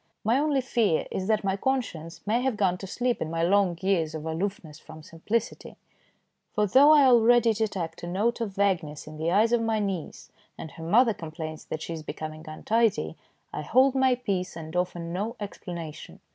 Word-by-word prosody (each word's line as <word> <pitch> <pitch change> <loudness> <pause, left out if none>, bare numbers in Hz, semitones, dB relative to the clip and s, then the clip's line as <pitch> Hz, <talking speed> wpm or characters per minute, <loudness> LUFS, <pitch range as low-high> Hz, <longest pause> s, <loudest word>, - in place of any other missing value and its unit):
My 230 +5 +2
only 290 -2 +1
fear 230 -9 +1
is 190 - -3
that 215 -1 +1
my 195 -1 0
conscience 195 -9 -3
may 225 +4 +1
have 255 -4 -1
gone 190 -3 +2
to 195 - -7
sleep 245 +4 -1
in 155 - -2
my 165 0 -1
long 185 -1 +2
years 165 -5 +1
of 155 0 -6
aloofness 160 -2 -4
from 155 0 -13
simplicity; 205 +9 -3 0.8
for 210 - +3
though 270 +9 +6
I 300 -2 +7
already 240 -1 +5
detect 195 -7 -3
a 175 - -6
note 210 +7 0
of 205 -4 -3
vagueness 175 -7 0
in 155 0 -10
the 160 +2 -1
eyes 215 +5 +3
of 240 -1 +3
my 225 -1 0
niece, 195 -6 -4 0.3
and 160 - -8
her 165 - -10
mother 225 +7 +4
complains 160 -2 -7
that 155 - -5
she 170 - -5
is 160 - -6
becoming 155 0 -7
untidy, 190 - 0 0.4
I - - -3
hold 255 - +3
my 265 -1 +3
peace, 195 -8 -3
and 160 0 -8
offer 180 0 -1
no 180 +7 -4
explanation. 170 -6 -8
195 Hz, 190 wpm, -27 LUFS, 165-230 Hz, 0.8 s, I